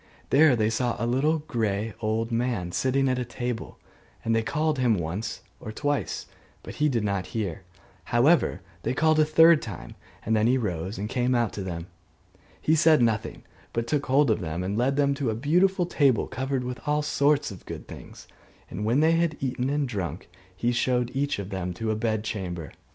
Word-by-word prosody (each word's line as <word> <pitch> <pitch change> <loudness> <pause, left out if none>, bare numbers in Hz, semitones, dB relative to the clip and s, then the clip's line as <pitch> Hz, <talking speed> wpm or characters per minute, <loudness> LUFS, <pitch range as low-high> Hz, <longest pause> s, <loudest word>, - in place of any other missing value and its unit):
There 145 -1 +6
they 110 -1 +1
saw 120 +1 0
a 115 - -2
little 135 +7 +2
grey 110 -5 -1
old 115 +1 -1
man 115 -7 -1
sitting 135 +7 +1
at 130 -1 +1
a - - -1
table; 120 -1 -5 0.5
and 115 0 +2
they 115 - +2
called 150 +6 0
to - - -1
him 120 -3 +3
once 95 +6 -4 0.2
or 110 - -7
twice, 145 +5 -2 0.4
but - - -9
he 150 0 +3
did 120 -5 0
not 100 -3 -1
hear: 95 -6 -3 0.4
however, 125 - +3 0.2
they 130 - -2
called 155 +1 +3
a 155 - +5
third 160 +1 +6
time, 100 -7 -8 0.3
and 110 - +2
then 110 +1 +3
he 130 +2 +3
rose 95 -4 -3
and 100 +2 -3
came 125 +2 0
out 120 -2 +1
to 100 - -5
them. 85 -3 -5 0.7
He 155 - +2
said 155 -4 +5
nothing, 110 -2 -1 0.3
but 115 0 -1
took 140 +3 -1
hold 135 -1 +4
of 110 - +1
them 85 +1 -3
and 95 +2 -2
led 125 +4 +1
them 140 -1 +2
to 140 -3 -2
a 110 - -1
beautiful 175 - +2
table 140 -8 +2
covered 130 0 -2
with 125 0 -5
all 150 0 +1
sorts 145 -2 +2
of 95 - -12
good - - -7
things: - - -11 0.4
and 95 +4 -4
when 120 +7 +2
they 160 +1 +4
had 165 -2 +1
eaten 130 -1 -1
and 145 -1 0
drunk, 95 -7 -5 0.3
he 120 +5 0
showed 125 0 +1
each 140 +2 0
of 100 0 -6
them 90 -2 -3
to 110 +3 -2
a - - 0
bed 110 -1 -1
chamber. 90 -7 -4
120 Hz, 205 wpm, -26 LUFS, 105-140 Hz, 0.7 s, There